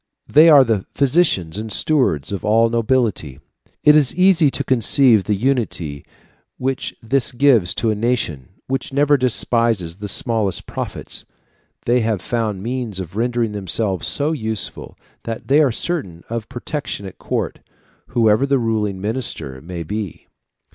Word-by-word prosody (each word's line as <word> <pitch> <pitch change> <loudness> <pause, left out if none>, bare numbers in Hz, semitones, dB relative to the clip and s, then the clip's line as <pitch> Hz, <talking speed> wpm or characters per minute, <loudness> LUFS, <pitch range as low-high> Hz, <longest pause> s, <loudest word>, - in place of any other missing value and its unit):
They 155 +3 +6
are 145 -4 +8
the 110 -6 -1
physicians 125 - +2
and 110 0 -6
stewards 115 - +1
of 100 - -4
all 115 +2 +3
the 120 - -1
nobility. 110 - -1 0.4
It 150 - +7
is 145 -4 +4
easy 180 -4 +4
to - - -2
conceive 120 -3 +3
the 105 - 0
unity 100 - -2 0.5
which 130 0 -3
this 125 +2 +2
gives 120 -8 +3
to 115 - 0
a - - -1
nation 105 - -2 0.2
which 135 +2 -3
never 145 +1 +3
despises 115 -8 0
the 105 0 -6
smallest 110 -2 0
profits. - - -4 0.6
They 120 +1 +3
have 110 -3 0
found 110 -5 -2
means 120 -4 -4
of 95 0 -7
rendering 120 0 0
themselves 100 -1 -1
so 150 +2 0
useful, 110 -8 -4 0.3
that 115 +2 -6
they 145 +3 +5
are 140 -4 +3
certain 105 - -4
of 115 -2 -4
protection 135 -4 -5
at 95 - -10
court, - - -3 0.5
whoever 115 +2 +2
the 140 0 +2
ruling 110 -5 -1
minister 105 - -4
may 85 +2 -6
be. 100 +2 -6
115 Hz, 150 wpm, -19 LUFS, 100-130 Hz, 0.6 s, are